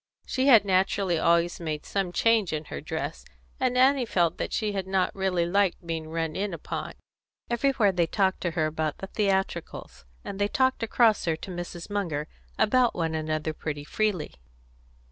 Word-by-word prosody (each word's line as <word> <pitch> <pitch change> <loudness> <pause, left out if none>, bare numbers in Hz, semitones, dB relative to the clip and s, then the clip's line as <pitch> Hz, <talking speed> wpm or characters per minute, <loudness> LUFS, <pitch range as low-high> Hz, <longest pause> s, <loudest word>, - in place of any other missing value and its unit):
She 260 +1 0
had 230 -7 +7
naturally 190 -2 +1
always 170 +1 +2
made 155 -3 -4
some 195 -3 -1
change 220 -3 +2
in 155 0 -3
her - - -4
dress, - - -4 0.4
and 255 -1 +1
Annie 260 -1 +4
felt 175 -5 +1
that - - -3
she 215 -2 -1
had 195 -2 -3
not 190 -1 +1
really 190 -3 0
liked 190 0 +1
being 160 -1 -4
run 165 -1 -2
in 195 -2 -2
upon. 160 - -5 0.6
Everywhere 235 -4 +2
they 175 -3 +1
talked 190 +1 +1
to 175 - -1
her 155 - +3
about 155 -1 -2
the - - -6
theatricals; 195 - -2 0.2
and 195 - -6
they 205 - +2
talked 260 +3 +1
across 225 -1 +3
her 165 -2 +1
to 185 - -8
Mrs. 175 -1 -6
Munger, 165 -7 -2 0.3
about 245 +2 +3
one 165 -2 -1
another, 155 0 -2
pretty 150 -1 -5
freely. 195 0 -1
185 Hz, 175 wpm, -27 LUFS, 165-210 Hz, 0.6 s, had